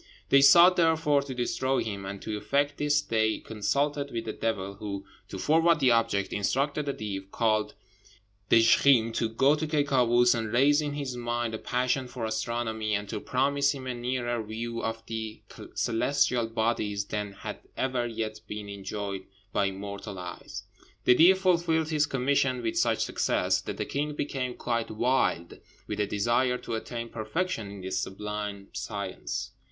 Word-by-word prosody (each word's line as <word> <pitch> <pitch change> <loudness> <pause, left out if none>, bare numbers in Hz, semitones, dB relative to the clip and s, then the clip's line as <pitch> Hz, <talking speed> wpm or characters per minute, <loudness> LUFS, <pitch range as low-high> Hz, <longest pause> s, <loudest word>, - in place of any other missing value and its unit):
They 140 - +6
sought, 170 +6 +8
therefore, 160 -4 +3
to 135 -2 -6
destroy 130 +2 0
him; 100 -3 -5
and 100 0 -6
to 110 - -3
effect 145 +6 0
this 145 0 +2
they 110 -4 +1
consulted 140 +7 -1
with 115 -3 -4
the 110 - -3
devil, 100 -4 -2
who, 100 -1 -6 0.2
to - - -6
forward 165 +1 +3
the 130 -3 +4
object, 115 -4 +1
instructed 140 +8 0
a - - 0
Deev, 95 -2 -5
called 110 0 0 0.7
Dizjkheem, 115 +1 +5
to 115 0 0
go 135 +6 +3
to 155 +1 -1
Ky 150 -1 +2
Kâoos 120 -3 +4
and 115 -2 -3
raise 145 +5 +4
in 145 -1 -3
his 140 -3 -4
mind 120 -1 -2
a 110 - -4
passion 125 +1 0
for 120 -2 -5
astronomy, 110 -1 -2
and 105 0 -3
to - - -3
promise 140 +2 +1
him 130 -1 -8
a 130 - -2
nearer 120 -1 -2
view 115 +2 -4
of 115 0 -4
the 110 -1 -6 0.3
celestial 120 0 +1
bodies 110 -3 -1
than 105 -1 -4
had - - -7 0.2
ever 130 -2 0
yet 110 -2 -4
been 105 -1 -6
enjoyed 100 -1 -5 0.3
by 100 -1 +2
mortal 100 +1 -7
eyes. 90 -1 -7 0.4
The - - +7
Deev 175 +8 +6
fulfilled 170 -4 +2
his 150 -2 +2
commission 130 -1 +1
with 115 - -1
such - - +2
success - - +1
that - - -6
the - - -2
king 145 +1 -2
became 130 -4 -3
quite 115 -1 -2
wild 110 -6 0 0.3
with - - -5
a 105 - +1
desire 120 +5 +1
to 115 - -6
attain 115 +1 -4
perfection 115 - -3
in 100 -1 -9
this 95 0 -2
sublime 105 0 -5
science. - - -4
120 Hz, 170 wpm, -28 LUFS, 105-140 Hz, 0.7 s, sought